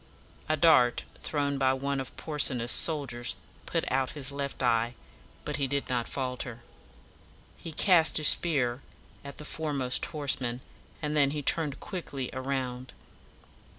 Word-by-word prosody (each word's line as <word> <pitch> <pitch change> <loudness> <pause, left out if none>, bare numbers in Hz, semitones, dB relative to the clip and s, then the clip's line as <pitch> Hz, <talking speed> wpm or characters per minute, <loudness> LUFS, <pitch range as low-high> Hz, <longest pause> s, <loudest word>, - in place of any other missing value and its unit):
A 155 - +2
dart 135 -7 +5 0.2
thrown 140 -2 -1
by 130 -1 +3
one 140 +1 -2
of 130 - -7
Porsena's 130 -6 +1
soldiers 135 -7 +1 0.3
put - - 0
out 130 0 +1
his 145 -2 -2
left 140 -1 -4
eye; 120 0 +2 0.5
but - - -2
he 140 -2 0
did 140 +1 -2
not 120 -2 0
falter. 125 -3 -4 0.9
He 165 - -8
cast 165 0 +4
his 155 - +5
spear 135 -7 +2 0.4
at 140 -1 -9
the 150 - -8
fore 155 0 -3
most 130 -2 +2
horseman, 130 -5 -1 0.4
and 150 0 -1
then 140 -2 +4
he 145 0 -4
turned 150 -1 +1
quickly 145 -10 -5
around. 130 -1 -3
140 Hz, 145 wpm, -29 LUFS, 125-150 Hz, 0.9 s, dart